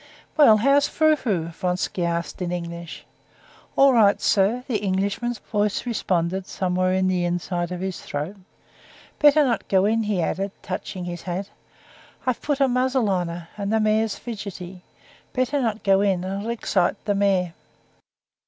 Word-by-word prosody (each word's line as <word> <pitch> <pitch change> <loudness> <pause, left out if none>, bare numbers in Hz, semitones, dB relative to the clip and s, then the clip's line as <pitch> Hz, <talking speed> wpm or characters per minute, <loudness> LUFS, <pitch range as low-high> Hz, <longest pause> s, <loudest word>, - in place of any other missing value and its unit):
"Well, 280 -9 +7
how's 275 +6 +4
Frou 310 -1 +3
Frou?" 195 - -2
Vronsky 180 +1 -2
asked 170 +1 -2
in 175 -1 -2
English. 170 -1 -6 0.7
"All 275 -1 +6
right, 210 -4 +5
sir," 220 +5 +2
the 240 -5 0
Englishman's 200 +5 -1
voice 210 +1 -1
responded 185 -5 -1
somewhere 185 0 0
in 185 0 +2
the 185 -1 +1
inside 175 0 -2
of 180 0 -4
his 190 -1 -4
throat. 150 +8 -5 0.8
"Better 295 +1 +6
not 245 -4 -1
go 190 0 +3
in," 225 +2 +2
he 210 -3 -1
added, 195 +4 -1
touching 185 -1 -5
his 175 0 -5
hat. 185 +2 -4 0.7
"I've 255 -2 -1
put 290 -1 -1
a 275 - +4
muzzle 255 -3 +1
on 180 -2 0
her, 170 0 -7
and 200 0 -3
the 220 - +3
mare's 215 0 +1
fidgety. 190 -5 -7 0.5
Better 255 +2 0
not 225 -3 -2
go 195 -1 +4
in, 190 -3 +1
it'll 195 +4 -4
excite 205 -6 +1
the 205 - +1
mare." 195 -4 +1
195 Hz, 160 wpm, -23 LUFS, 180-225 Hz, 0.8 s, Well